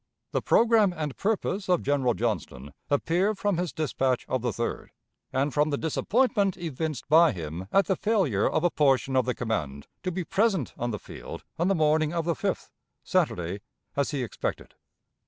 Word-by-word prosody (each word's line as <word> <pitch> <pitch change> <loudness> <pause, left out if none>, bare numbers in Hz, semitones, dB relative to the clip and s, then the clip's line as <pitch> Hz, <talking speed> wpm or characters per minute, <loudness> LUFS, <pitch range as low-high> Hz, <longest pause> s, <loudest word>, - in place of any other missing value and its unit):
The - - 0
programme 225 -5 +4
and 150 -4 -3
purpose 200 -2 -1
of 180 -2 +3
General 135 -4 +1
Johnston 85 - -3 0.2
appear 175 +8 +1
from 200 -2 0
his 180 -2 -1
dispatch 135 -5 -1
of 130 - -1
the 120 - 0
3d, 115 +2 -3 0.4
and 135 +1 0
from 150 +3 +2
the 145 - 0
disappointment 200 - +1
evinced 160 -4 -4
by 160 -1 +6
him 85 +1 -6
at 195 - +4
the 190 - +1
failure 185 - +1
of 155 - 0
a 175 - +3
portion 135 -2 +2
of 130 - +3
the 125 - 0
command 75 - -3 0.2
to 185 - -2
be 180 +1 -3
present 195 - +1
on 120 - -2
the 105 - -2
field - - -9 0.2
on 170 - +2
the 195 - +3
morning 155 0 +2
of 165 -2 -1
the 170 - +1
5th - - -3 0.3
(Saturday), 90 +3 0 0.3
as 140 -1 +1
he 140 -4 -2
expected. 115 - -4
150 Hz, 180 wpm, -27 LUFS, 125-180 Hz, 0.4 s, by